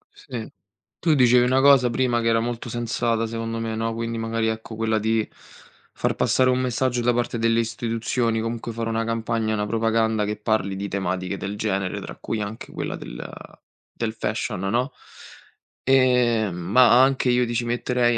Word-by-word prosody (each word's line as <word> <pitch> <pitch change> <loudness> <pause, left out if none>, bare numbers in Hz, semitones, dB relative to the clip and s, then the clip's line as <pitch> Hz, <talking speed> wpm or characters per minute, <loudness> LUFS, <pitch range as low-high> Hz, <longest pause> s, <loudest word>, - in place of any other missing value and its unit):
Sì. - - -7 0.5
Tu 160 -3 +3
dicevi 125 -1 +5
una 130 +1 +3
cosa 135 -3 +6
prima 120 -1 +1
che 115 - -1
era 115 0 +3
molto 120 +1 -4
sensata, 115 -1 -1
secondo 115 0 -4
me, 115 -1 -3
no, 115 +1 -1
quindi, 115 0 -3
magari, 115 0 -1
ecco, 110 0 -4
quella 110 0 0
di 110 0 0 0.6
far - - -1
passare 130 0 +3
un 125 - +1
messaggio 125 -1 0
da 120 +1 +2
parte 120 0 -1
delle 115 0 +2
istituzioni, 115 0 -1
comunque 115 +1 -3
fare 115 0 -3
una 115 0 0
campagna, 115 -1 -1
una 105 -1 -1
propaganda, 110 0 +1
che 105 +1 -2
parli 105 -3 0
di 100 +1 -4
tematiche 95 -1 -2
del 100 +1 -5
genere, 100 -3 -1
tra - - -8
cui 110 -1 -4
anche 105 +2 -6
quella - - -4
del - - -8 0.7
del 110 -1 -2
fashion, 110 -4 -3
no. 120 +8 0 0.9
Ehm, 125 -6 +3
ma 120 +8 +5
anche 135 -1 +2
io 125 0 +3
ti 120 - -4
ci 120 - 0
metterei 120 0 +1
115 Hz, 175 wpm, -23 LUFS, 110-120 Hz, 0.9 s, cosa